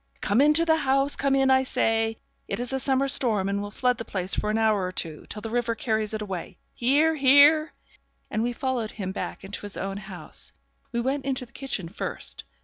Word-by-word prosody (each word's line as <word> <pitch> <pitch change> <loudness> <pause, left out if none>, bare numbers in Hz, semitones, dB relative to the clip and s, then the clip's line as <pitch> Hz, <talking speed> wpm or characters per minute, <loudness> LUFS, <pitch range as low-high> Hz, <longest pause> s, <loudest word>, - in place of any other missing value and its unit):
'Come 210 +5 +2
into 300 +3 +4
the 320 -1 +4
house 275 -1 +2
come 275 -1 +1
in, 270 -1 +3
I 260 0 +5
say. 225 -3 0 0.3
It 200 - -3
is 245 +2 -2
a 265 - 0
summer 270 0 +1
storm, 220 -8 +2
and 200 0 -1
will 205 - -5
flood 250 +3 0
the - - -3
place 190 -3 -1
for 210 - -1
an 215 - +1
hour 215 -3 +2
or 180 - -2
two, 160 -4 -4
till 210 - -7
the 225 - -4
river 235 -1 0
carries 220 -2 -1
it 215 - -3
away. 190 -4 -6 0.2
Here, 290 +6 +3
here.' 290 +2 +6 0.6
And 215 - 0
we 240 +2 0
followed 245 -2 -2
him 195 -4 -5
back - - -5
into 195 +1 -5
his 205 -1 -2
own 195 0 -3
house. 195 -3 -4 0.4
We 235 - -1
went 270 +3 -2
into 260 -2 0
the - - -23
kitchen 250 -10 -3
first. 180 - -5
235 Hz, 220 wpm, -26 LUFS, 205-270 Hz, 0.6 s, here